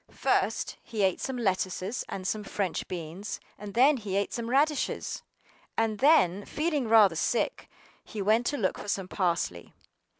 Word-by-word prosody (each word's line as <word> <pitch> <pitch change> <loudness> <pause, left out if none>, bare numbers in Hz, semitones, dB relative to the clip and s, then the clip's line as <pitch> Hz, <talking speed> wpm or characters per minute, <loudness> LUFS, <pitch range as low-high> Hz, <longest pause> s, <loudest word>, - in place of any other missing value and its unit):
FIRST - - 0
he 215 -3 -3
ate 190 -2 +1
some 265 -1 -3
lettuces 190 0 -1
and 185 - -5
some 210 +2 -1
French 195 -3 -2
beans; 175 +4 -6 0.2
and 205 0 -8
then 270 +4 +5
he 205 -5 -4
ate 200 0 0
some 235 -1 -3
radishes; 290 +3 0 0.6
AND 220 -2 0
then, 205 - +4
feeling 300 -3 -1
rather 215 -6 +6
sick, 235 - -1 0.3
he 215 - -8
went 220 +4 +2
to 290 - 0
look 195 -7 -1
for - - -8
some 195 -2 -1
parsley. 170 - -2
210 Hz, 160 wpm, -28 LUFS, 190-240 Hz, 0.6 s, rather